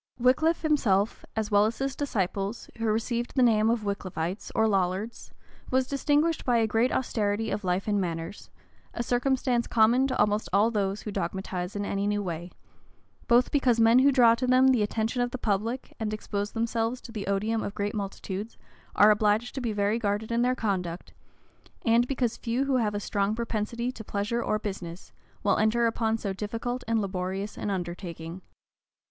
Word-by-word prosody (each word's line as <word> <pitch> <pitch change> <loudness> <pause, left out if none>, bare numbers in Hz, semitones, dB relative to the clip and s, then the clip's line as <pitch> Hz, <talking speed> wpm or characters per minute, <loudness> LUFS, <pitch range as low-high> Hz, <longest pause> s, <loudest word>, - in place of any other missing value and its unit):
Wickliffe 300 +8 +3
himself, 225 -10 +1
as 220 -1 -2
well 205 +1 +5
as 225 - -4
his 270 0 -2
disciples, 200 -5 -2
who 230 - -1
received 230 +2 -1
the 260 - +4
name 220 -2 +4
of 230 -1 +1
Wickliffites, 190 -2 -3
or 220 - +3
Lollards, 195 +2 -1 0.4
was 260 0 +2
distinguished 290 +4 +1
by 245 -2 +2
a 225 - +3
great 225 +3 +1
austerity 220 -3 -1
of 210 - -2
life 180 +2 -1
and 205 -1 +1
manners; 165 +1 -5 0.5
a 235 - -1
circumstance 245 0 +1
common 240 +4 +4
to 255 - -2
almost 210 +1 +1
all 210 +3 +3
those 200 -2 -1
who 210 - -5
dogmatize 185 0 -3
in 205 0 -2
any 200 0 -1
new 205 0 0
way; 175 -1 -5 0.8
both 240 +2 +4
because 255 -5 +2
men 230 +2 +6
who 280 +2 +5
draw 240 -4 +6
to 255 +2 -1
them 255 +1 +5
the 250 -4 +3
attention 220 +3 -1
of 245 - +1
the 255 - -5
public, 225 +3 -2
and 215 -1 -2
expose 205 -1 -4
themselves 230 +1 -1
to 235 - -11
the 210 -4 -5
odium 215 +3 0
of 200 - -5
great 205 0 -2
multitudes, 200 +1 -5 0.4
are 210 +1 +7
obliged 210 +3 +2
to 270 - -4
be 235 -3 -1
very 205 +2 0
guarded 210 +1 -1
in 235 0 +1
their 250 +1 +2
conduct, 185 -7 -3 0.7
and 235 +1 +4
because 245 -4 -1
few 245 +3 -1
who 270 -2 +2
have 210 -4 0
a - - -1
strong 200 0 -1
propensity 235 +1 -2
to 225 -3 -9
pleasure 210 +3 -2
or 215 - 0
business, 190 -4 -6 0.3
will 200 - +3
enter 220 +2 +3
upon 225 -1 +1
so 200 -3 -3
difficult 230 +5 -4
and 225 -1 +2
laborious 195 +1 -3
an - - -4
undertaking. 175 -2 -5
220 Hz, 185 wpm, -27 LUFS, 200-240 Hz, 0.8 s, are